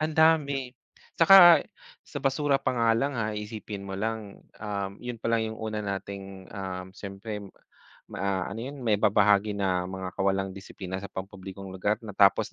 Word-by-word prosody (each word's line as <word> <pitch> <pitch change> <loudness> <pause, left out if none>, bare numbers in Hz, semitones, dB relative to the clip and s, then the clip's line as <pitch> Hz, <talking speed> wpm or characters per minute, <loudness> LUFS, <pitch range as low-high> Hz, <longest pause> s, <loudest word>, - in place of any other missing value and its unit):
ang 155 0 -1
dami, 140 -5 +3 0.4
saka 175 -2 +9 0.4
sa - - -7
basura 140 +1 +2
pa - - 0
nga 115 -1 +3
lang 140 +1 -1
ha, 110 -1 -1
iisipin 105 -1 -6
mo 95 -1 -5
lang, 110 -1 -4 0.2
um, 100 -2 -3
yun 120 -1 -5
palang 115 0 +1
yung - - -10
una 110 -1 -3
nating 95 -1 -6
um, 95 -2 -5
siyempre 105 +2 -6 0.7
ma 95 -1 -1
ano - - -6
yun? 135 +2 -7
Maibabahagi 105 -1 +3
na 90 -2 0
mga 95 0 -5
kawalang 95 0 +1
disiplina 95 -1 -7
sa 100 - -6
pampublikong 95 0 -8
lugar 100 +3 0
na 110 - -7
tapos 100 0 +4
105 Hz, 160 wpm, -27 LUFS, 95-115 Hz, 0.7 s, saka